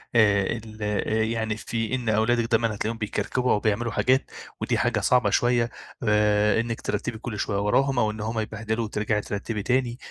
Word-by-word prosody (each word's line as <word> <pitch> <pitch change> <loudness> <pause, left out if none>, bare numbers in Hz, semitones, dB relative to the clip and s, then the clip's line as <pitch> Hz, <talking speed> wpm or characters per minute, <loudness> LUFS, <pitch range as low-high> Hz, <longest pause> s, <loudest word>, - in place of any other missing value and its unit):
آآ 105 -3 +5
ال 110 -1 -11
آآ 105 +1 0
يعني 110 -1 -1
في 115 +2 -2
إن 120 -3 -2
أولادِك 115 +2 +2
دايمًا 115 -1 +2
هتلاقيهم 110 +2 -3
بيكركبوا 125 +3 -1
أو 105 - +3
بيعملوا 110 +2 0
حاجات 130 +4 +1 0.3
ودي - - 0
حاجة - - +1
صعبة 125 -1 +3
شوية، 120 -1 +2 0.3
آآ 105 0 +3
إنِّك 115 -1 -4
ترتِّبي 110 +3 -3
كل 110 -2 -6
شوية 100 - -1
وراهم 135 +6 +2
أو 110 -2 +2
إن 105 0 -7
هم 110 +1 -2
يبهدلوا 110 +1 -2
وترجعي 105 0 -1
ترتِّبي 105 +1 -4
تاني، 125 -1 0
110 Hz, 180 wpm, -25 LUFS, 105-120 Hz, 0.3 s, آآ